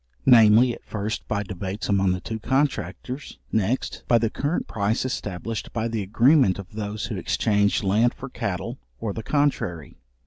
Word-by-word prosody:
Namely, 120 0 +7
at - - -11
first 110 +2 -4
by 105 -1 -1
debates 95 +1 -5
among 95 -2 +2
the 90 - -1
two 110 +4 -5
contractors, 130 - -2
next, 110 +4 -1
by 120 - +5
the 115 -1 0
current 145 +5 -2
price 110 +3 -1
established 110 -3 -4
by 115 0 -1
the 115 -2 -2
agreement 120 - +4
of 100 -2 -9
those 105 0 -4
who 110 -3 -4
exchange 105 +3 +1
land 110 +5 +2
for 135 - -7
cattle, 95 -8 -4 0.2
or 105 - -3
the 110 - -5
contrary. 110 - -1
110 Hz, 165 wpm, -24 LUFS, 100-120 Hz, 0.2 s, Namely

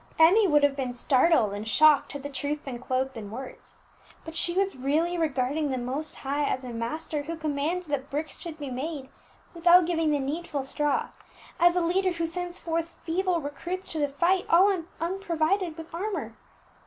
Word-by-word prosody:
Emmie 380 +7 +6
would 295 -3 +4
have 285 -1 +3
been 255 -3 -3
startled 255 -3 +3
and 205 +2 -5
shocked 300 +7 +5
had 285 -1 -6
the - - -3
truth 290 +2 -3
been 250 -3 -5
clothed 260 +1 -2
in 210 -2 -7
words, 255 +5 -9 0.5
but 320 - -7
she 345 - +4
was 390 0 +1
really 300 +7 0
regarding 295 -2 0
the 260 - -1
Most 265 +5 -4
High 280 +2 -2
as 260 -2 -1
a 250 - -6
Master 290 +6 -3
who 325 +3 -5
commands 315 +3 -2
that 285 -3 -3
bricks 300 +2 -4
should 330 -2 -7
be 285 -3 -6
made 270 +1 -4 0.4
without 345 +1 +6
giving 325 -2 +1
the 295 - +2
needful 285 +1 -3
straw, 290 +1 -1 0.5
as 345 +1 +5
a 360 - +2
Leader 365 +2 +1
who 335 -1 -2
sends 355 +1 -4
forth 330 0 -3
feeble 350 0 0
recruits 345 +6 -5
to 320 - -2
the 290 -1 +1
fight 345 +6 +1
all 385 +4 +5 0.2
unprovided 345 -1 -1
with 325 0 -10
armour. 400 +5 -3
310 Hz, 185 wpm, -27 LUFS, 275-345 Hz, 0.5 s, Emmie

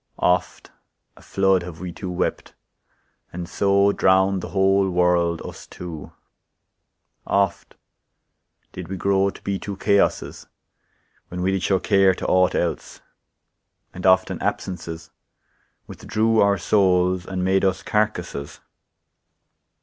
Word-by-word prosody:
Oft 90 0 0 0.4
a - - -18
flood 95 -1 +1
Have 85 -2 -9
we 90 0 -6
two 90 +2 -7
wept, 90 - -3 0.8
and 85 0 -6
so 100 +1 +2
Drown'd 95 0 +2
the - - -6
whole 95 0 +2
world, 90 -2 +1
us - - -10
two; 85 -4 -9 1.2
oft 100 -3 -1 1.0
did 90 -2 -8
we 95 +2 -5
grow, 100 +1 +2
To - - -11
be 100 -1 -2
two 100 -2 -6
chaoses, 100 0 0 0.8
when 90 0 -5
we 95 - +1
did 95 -1 -1
show 95 +1 +2
Care 95 -1 +3
to - - -6
aught 90 0 +2
else; 85 - -3 0.9
and 90 +1 -2
often 95 0 +3
absences 85 -2 -4 0.7
Withdrew 110 +1 -1
our 100 0 +3
souls, 90 -1 +2
and 95 -1 -3
made 95 +1 +2
us 95 -1 0
carcasses. 90 -9 -2
95 Hz, 125 wpm, -22 LUFS, 90-100 Hz, 1.2 s, Care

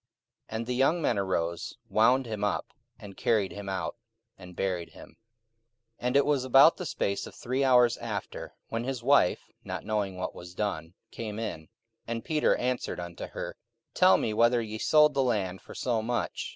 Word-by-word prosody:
44:005:006 110 - -3
And 115 - -3
the 125 - -2
young 135 +7 +3
men 130 -8 +1
arose, 85 -3 -2
wound 125 +4 +3
him 110 -3 -4
up, 105 - 0 0.3
and 100 -2 -11
carried 105 -5 +1
him 100 -1 -7
out, 95 +4 -3 0.4
and 90 -2 -13
buried 90 -3 -2
him. - - -12
44:005:007 - - -23 0.9
And 125 - 0
it 140 - +4
was 145 -3 +1
about 135 +5 +6
the 180 - -5
space 100 0 -2
of - - -12
three 130 +3 -1
hours 125 -2 +5
after, 110 -4 -6
when 115 +1 -2
his 125 -2 -4
wife, 140 -8 +4 0.2
not - - -5
knowing 100 -3 -1
what 90 - -4
was 90 0 -11
done, 90 -5 -3 0.2
came 110 -2 -6
in. 110 -7 -3
44:005:008 80 - -19 0.4
And 115 0 -4
Peter 155 -1 +2
answered 125 -5 -2
unto 85 -1 -6
her, - - -6 0.4
Tell 95 - +6
me 110 - -1
whether 120 +2 +4
ye 110 -1 -5
sold 150 +2 +5
the 135 - +2
land 100 -7 -1
for - - -12
so 120 -3 0
much? 120 +2 -2
115 Hz, 190 wpm, -28 LUFS, 95-125 Hz, 0.9 s, about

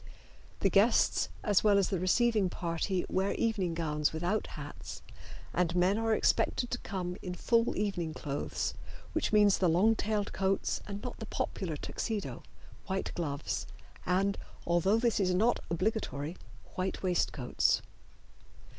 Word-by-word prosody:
The 195 - +4
guests 215 +6 +4
as 205 -2 +3
well 205 -2 +5
as 195 - +2
the 190 - 0
receiving 210 +2 +3
party 175 +2 -1
wear 190 +1 0
evening 195 -7 0
gowns 150 -2 0
without 175 +7 -1
hats, 145 0 -8 0.5
and 175 -1 +1
men 185 +4 +3
are 225 -1 +2
expected 245 - +1
to 250 - -1
come 180 -2 -4
in 180 -1 -5
full 230 +4 +2
evening 175 -6 -1
clothes, 145 -2 -3 0.4
which 320 - 0
means 205 -2 +5
the 180 - +3
long 190 +7 +4
tailed 210 -1 -1
coats 195 0 0
and 200 0 -6
not 250 - -6
the 220 - -6
popular 165 -6 -3
Tuxedo, 215 +6 -4 0.5
white 190 -1 -2
gloves, 145 -4 -3 0.4
and, 195 +3 +1 0.3
although 175 +5 +3
this 235 -1 +2
is 185 -2 +2
not 225 +6 +3
obligatory, 170 -4 -1 0.4
white 185 +1 -3
waistcoats. 170 -8 +1
190 Hz, 140 wpm, -31 LUFS, 175-210 Hz, 0.5 s, well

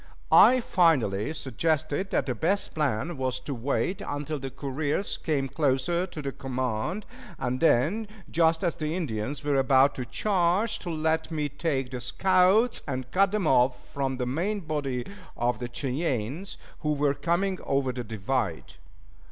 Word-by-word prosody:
I 255 0 +7
finally 145 - +2
suggested 155 - -1
that 135 - +1
the 130 - -1
best 180 - 0
plan 150 +1 -1
was 130 -1 -1
to 140 +2 -5
wait 140 +9 -1
until 145 +1 -4
the 135 0 -5
couriers 145 +7 -2
came 140 -4 -1
closer 140 +5 0
to 155 - -7
the 140 - -2
command, 130 - -3 0.3
and 125 +1 -2
then, 165 - +3 0.2
just 165 0 +2
as 175 - +1
the 155 +1 -2
Indians 140 -4 -3
were 145 -1 +1
about 135 +1 +5
to 125 - -5
charge, 195 - +1
to 175 - -6
let 160 0 0
me 150 -3 -2
take 140 -3 -2
the 125 -1 -5
scouts 190 - +3
and 130 -2 -4
cut 195 +3 +3
them 210 -4 0
off 125 -2 +2
from 135 -2 -1
the 125 - -1
main 180 +11 -1
body 140 -6 -2 0.3
of 120 -1 0
the 120 -1 -4
Cheyennes 135 - -2 0.2
who 150 -1 0
were 145 -1 +2
coming 175 +6 0
over 135 -1 0
the 125 0 -5
divide. 110 - -2
145 Hz, 160 wpm, -27 LUFS, 130-170 Hz, 0.3 s, I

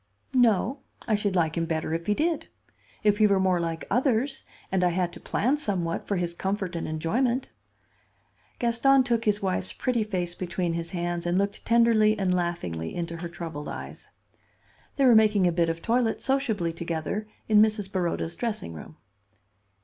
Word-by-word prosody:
"No. 245 +1 +3 0.3
I 225 - +1
should 205 -2 0
like 160 -3 +1
him 165 -1 -1
better 160 -1 -2
if 165 +1 -3
he 210 - +2
did; 325 +4 0 0.6
if 210 0 +3
he 215 - +6
were 200 -1 +3
more 185 -2 +2
like 165 -1 -3
others, 260 +1 +1 0.3
and 190 -1 +1
I 180 - +4
had 175 0 -1
to - - -9
plan 270 +7 0
somewhat 180 - -2
for 200 - 0
his 175 -2 -1
comfort 190 0 -3
and 165 - -3
enjoyment." 235 +12 0 1.1
Gaston 255 +3 +3
took 235 -2 0
his 210 -1 +1
wife's 185 -1 -1
pretty 245 -4 0
face 180 -5 -2
between 175 -1 -2
his 170 0 -3
hands 175 -1 -3
and 175 +1 +1
looked 200 +1 -1
tenderly 225 -2 +4
and 190 -2 +1
laughingly 170 - -2
into 170 -1 -4
her 170 0 -5
troubled 165 -3 -6
eyes. - - -8 0.9
They 275 - +3
were 250 - +7
making 215 -3 +5
a 175 - +4
bit 170 0 +1
of 165 0 -4
toilet 230 -1 +1
sociably 225 -11 0
together 170 +5 -3 0.2
in 210 -1 +6
Mrs. 210 -3 +1
Baroda's 170 -3 -1
dressing 215 - -3
room. 80 0 -11
190 Hz, 175 wpm, -26 LUFS, 170-225 Hz, 1.1 s, were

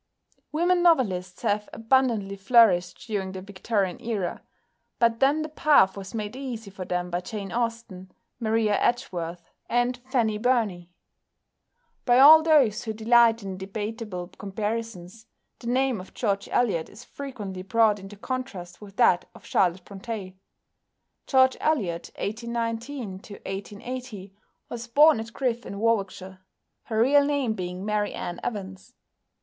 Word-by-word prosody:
Women 350 +3 +2
novelists 195 - +2
have 210 +1 0
abundantly 225 -4 +1
flourished 195 -4 +4
during 195 -4 -3
the 190 - -6
Victorian 200 0 -2
Era, 220 -7 -3 0.6
but 230 -1 +2
then 285 +3 +3
the - - -4
path 295 -10 +4
was 195 +1 -8
made 210 +1 -4
easy 240 -6 -6
for 190 -1 -7
them 180 0 -2
by 175 +1 -1
Jane 200 -1 -6
Austen, 230 -6 -4 0.3
Maria 220 -2 +1
Edgeworth, 170 -7 -2 0.2
and 245 +1 +1
Fanny 225 -5 +1
Burney. 215 -8 0 1.1
By 245 -1 +4
all 305 +4 +10
those 275 -10 +3
who 220 - -3
delight 230 0 +4
in 190 -1 -5
debatable 205 -2 -5
comparisons 215 0 -5 0.3
the 235 - -9
name 255 -3 +1
of 185 - -15
George 200 -4 -1
Eliot 200 -10 +1
is 210 +4 -13
frequently 210 -10 -7
brought 210 +2 +2
into 195 +1 -10
contrast 205 -7 -6
with 200 -2 -12
that 180 -7 +3
of - - -15
Charlotte 180 0 +1
Brontë. 200 -1 -7 0.9
=George 260 -1 +4
Eliot 195 - 0
(1819 230 0 -4
1880)= 205 +2 -7 0.4
was 235 0 -7
born 295 +2 +6
at 225 +1 -6
Griff 245 -2 -2
in 200 - -7
Warwickshire, 195 -4 -1 0.5
her 220 -2 -2
real 280 +5 +5
name 280 -5 0
being 180 -1 -5
Mary 210 -1 -1
Ann 175 0 -5
Evans. 195 +1 -6
220 Hz, 135 wpm, -26 LUFS, 190-245 Hz, 1.1 s, all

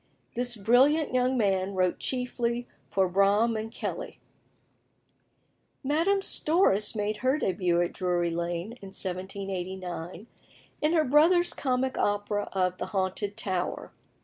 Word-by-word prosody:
This 245 0 -1
brilliant 255 +9 +3
young 255 +1 +2
man 195 -3 +1
wrote 185 -1 +1
chiefly 245 -1 -2 0.2
for 190 -1 +2
Braham 200 +5 +3
and 220 +1 -4
Kelly. - - -5 1.6
Madame 330 +8 +2
Storace 300 - +2
made 210 0 -1
her 260 +5 +1
début 180 - +1
at - - -7
Drury 175 -2 0
Lane, 170 +4 -3
in 195 - -9
1789, 185 -1 -5 0.6
in 305 +2 +2
her 320 -2 +4
brother's 325 +6 +4
comic 260 -1 -1
opera 205 0 0
of 185 -1 0
"The - - -3
Haunted 195 +1 -2
Tower." 185 -4 -3
205 Hz, 120 wpm, -28 LUFS, 185-255 Hz, 1.6 s, her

